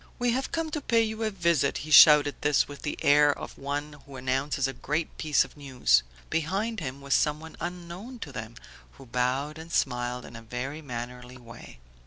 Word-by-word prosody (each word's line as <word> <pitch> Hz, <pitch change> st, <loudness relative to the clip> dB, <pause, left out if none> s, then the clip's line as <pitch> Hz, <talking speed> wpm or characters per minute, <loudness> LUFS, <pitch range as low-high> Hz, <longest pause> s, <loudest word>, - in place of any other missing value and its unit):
"We 245 Hz, 0 st, +1 dB
have 260 Hz, +3 st, -2 dB
come 325 Hz, -1 st, -2 dB
to 300 Hz, -, -3 dB
pay 230 Hz, -3 st, +3 dB
you 220 Hz, 0 st, -4 dB
a 220 Hz, -, +1 dB
visit!" 170 Hz, -8 st, +1 dB
He 155 Hz, -, -8 dB
shouted 150 Hz, -2 st, +8 dB
this 145 Hz, -1 st, +3 dB
with 145 Hz, -1 st, -10 dB
the 150 Hz, -, -4 dB
air 145 Hz, 0 st, +6 dB
of -, -, -8 dB
one 145 Hz, +2 st, -4 dB
who 140 Hz, -, -11 dB
announces 135 Hz, +2 st, -1 dB
a 135 Hz, -, -4 dB
great 150 Hz, +6 st, -3 dB
piece 155 Hz, -2 st, +3 dB
of -, -, -16 dB
news. 130 Hz, -, +2 dB, 0.3 s
Behind 195 Hz, +8 st, -1 dB
him 140 Hz, -3 st, -6 dB
was 140 Hz, 0 st, -1 dB
someone 155 Hz, +1 st, 0 dB
unknown 180 Hz, +7 st, -7 dB
to 145 Hz, -, -6 dB
them, 110 Hz, -2 st, -7 dB, 0.4 s
who 135 Hz, -, -14 dB
bowed 130 Hz, +5 st, -1 dB
and 165 Hz, +1 st, -10 dB
smiled 125 Hz, -3 st, -1 dB
in 115 Hz, -, -11 dB
a 115 Hz, -, -8 dB
very 125 Hz, +6 st, -5 dB
mannerly 125 Hz, -1 st, -7 dB
way. 115 Hz, -2 st, -13 dB
145 Hz, 195 wpm, -27 LUFS, 130-170 Hz, 0.4 s, shouted